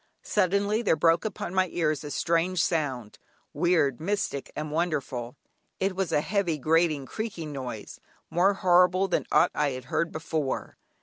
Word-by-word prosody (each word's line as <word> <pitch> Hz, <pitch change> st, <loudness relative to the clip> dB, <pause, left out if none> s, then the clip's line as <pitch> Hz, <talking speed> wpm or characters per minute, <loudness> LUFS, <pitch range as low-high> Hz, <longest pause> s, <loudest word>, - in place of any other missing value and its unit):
Suddenly 200 Hz, +4 st, +1 dB
there 205 Hz, -, +3 dB
broke 165 Hz, +4 st, +3 dB
upon 205 Hz, -4 st, -4 dB
my 185 Hz, 0 st, +2 dB
ears 155 Hz, -4 st, -1 dB
a 150 Hz, -, -6 dB
strange 170 Hz, +3 st, +1 dB
sound, 135 Hz, -10 st, -2 dB, 0.3 s
weird, 160 Hz, -7 st, +2 dB
mystic, 185 Hz, -6 st, -2 dB
wonderful. 150 Hz, -6 st, -2 dB, 0.4 s
It 190 Hz, 0 st, 0 dB
was 190 Hz, -3 st, -1 dB
a 150 Hz, -, +2 dB
heavy, 190 Hz, -3 st, 0 dB
grating, 155 Hz, -1 st, +2 dB
creaking 175 Hz, -5 st, -5 dB
noise, 125 Hz, -6 st, -7 dB, 0.3 s
more 190 Hz, +4 st, +3 dB
horrible 180 Hz, +1 st, +4 dB
than 180 Hz, -, -1 dB
aught -, -, +4 dB
I 150 Hz, -1 st, +1 dB
had 130 Hz, -1 st, -7 dB
heard 165 Hz, 0 st, +1 dB
before. 155 Hz, -3 st, -3 dB
165 Hz, 145 wpm, -27 LUFS, 150-185 Hz, 0.4 s, horrible